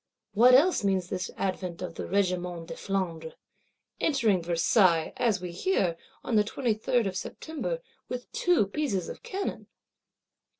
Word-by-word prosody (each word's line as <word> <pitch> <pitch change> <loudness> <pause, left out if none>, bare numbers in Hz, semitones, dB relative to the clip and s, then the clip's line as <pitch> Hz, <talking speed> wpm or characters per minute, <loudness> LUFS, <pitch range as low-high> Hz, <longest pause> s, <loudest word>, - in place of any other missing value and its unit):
What 245 +4 +7
else 320 - +4
means 190 -3 +1
this 185 -2 -3
advent 185 -2 -3
of 175 -2 -5
the - - -6
Regiment 180 -3 -1
de - - -4
Flandre; 170 -5 -3 0.6
entering 230 - +2
Versailles, 170 0 +3
as 230 -5 +2
we 180 -1 -6
hear, 180 - 0 0.3
on 235 - -1
the 210 - +5
23rd 225 +1 0
of 190 - -4
September, 325 - -4 0.3
with 250 -1 -6
two 355 - +3
pieces 200 - -2
of - - -8
cannon? 390 +1 -4
195 Hz, 140 wpm, -28 LUFS, 180-250 Hz, 0.6 s, What